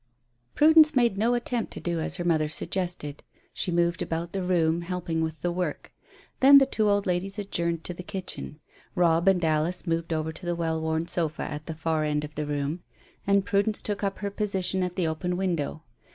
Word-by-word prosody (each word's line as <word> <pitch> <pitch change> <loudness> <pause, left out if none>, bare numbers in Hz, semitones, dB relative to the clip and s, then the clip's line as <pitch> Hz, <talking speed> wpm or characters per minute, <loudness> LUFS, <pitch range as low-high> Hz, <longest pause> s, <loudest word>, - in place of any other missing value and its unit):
Prudence 310 0 +7
made 240 -5 +3
no 230 +4 +2
attempt 240 -1 -2
to - - -7
do 170 -1 -2
as 160 - -2
her 175 - -4
mother 160 -3 +1
suggested. 175 -3 -4 0.3
She - - -1
moved 170 0 +1
about 165 +1 -3
the 195 - -2
room, 170 -2 +1
helping 170 -2 -3
with 160 0 -3
the 175 - +1
work. 175 -4 -4 0.5
Then 280 +2 +9
the 275 - +7
two 220 -5 +1
old 205 0 +2
ladies 185 +2 -1
adjourned 170 -5 -2
to 180 - -4
the 175 - -8
kitchen. 180 -5 -6 0.4
Robb 170 0 +3
and 180 -3 +4
Alice 155 +3 +1
had - - -22
moved 165 0 -1
over 160 0 -1
to 160 - -13
the 175 - 0
well 160 -1 -1
worn 160 +1 -1
sofa 160 -4 -1
at 150 0 -6
the 160 - -4
far 160 -1 -1
end 150 0 0
of 150 0 -7
the 150 0 -3
room, 145 +3 -2 0.5
and 200 -1 +3
Prudence 205 +2 +1
took 205 -1 -4
up 195 -1 -1
her 200 -1 -4
position 195 -2 0
at 180 -1 -2
the 185 - 0
open 175 +3 -2
window. 165 -5 -2
175 Hz, 210 wpm, -27 LUFS, 160-195 Hz, 0.5 s, Then